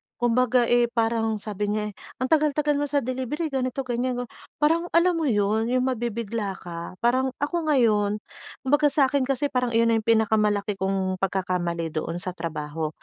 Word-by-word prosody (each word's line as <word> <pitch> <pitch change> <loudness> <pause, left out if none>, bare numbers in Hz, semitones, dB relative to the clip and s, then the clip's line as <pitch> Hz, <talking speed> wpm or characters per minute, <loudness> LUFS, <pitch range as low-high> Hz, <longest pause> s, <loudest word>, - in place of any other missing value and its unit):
kumbaga 245 +1 +2
eh, 240 0 +3
parang 225 -1 0
sabi 210 -1 -4
niya 210 0 -1
eh: - - -22 0.3
"Ang 260 - -2
tagal-tagal 295 -1 +2
mo 290 - 0
sa 285 -2 0
delivery, 260 +5 -3
ganito, 260 0 -1
ganyan." 245 0 -2 0.3
Parang 330 +3 +2
alam 340 0 +4
mo 310 - 0
'yun, 215 0 +1
yung 255 +1 +1
mabibigla 230 -5 -2
ka 170 +1 -7
Parang 260 +2 +2
ako 330 +1 -1
ngayon 210 -6 +2 0.4
kumbaga 290 +3 +3
sa 275 -2 +2
akin 275 -2 +1
kasi 275 +1 0
parang 250 -2 0
iyon 230 0 +4
na - - +3
yung 220 - -11
pinakamalaki 210 -3 +2
kong 190 -1 -1
pagkakamali 180 -3 -1
doon 160 +2 -3
sa 180 +1 -4
trabaho. 155 -2 -4
230 Hz, 170 wpm, -25 LUFS, 205-265 Hz, 0.4 s, alam